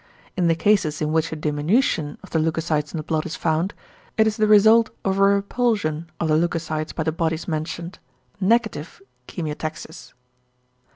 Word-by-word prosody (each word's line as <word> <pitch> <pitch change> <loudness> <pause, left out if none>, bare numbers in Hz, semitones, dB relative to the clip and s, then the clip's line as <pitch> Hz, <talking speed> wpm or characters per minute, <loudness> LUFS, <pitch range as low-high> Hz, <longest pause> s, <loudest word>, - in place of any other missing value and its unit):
In 180 -2 +1
the 165 - +3
cases 170 -5 +2
in 155 -1 -1
which 160 0 +1
a - - -3
diminution 150 - 0
of - - -13
the 160 - +1
leucocytes 155 -1 -1
in - - -5
the 155 - -4
blood 155 0 -1
is 170 - -5
found, 165 +4 -1 0.4
it 220 - +5
is 220 -1 +1
the 215 -1 +2
result 220 +2 +6 0.2
of 195 0 +1
a - - +3
repulsion 200 -5 +1
of 165 - 0
the 155 - +3
leucocytes 160 -2 -1
by 160 - -3
the 160 - 0
bodies 160 0 -2
mentioned, 170 +2 -4 0.4
=negative 215 -5 0 0.3
chemiotaxis=. 155 0 -6
165 Hz, 170 wpm, -23 LUFS, 155-200 Hz, 0.4 s, result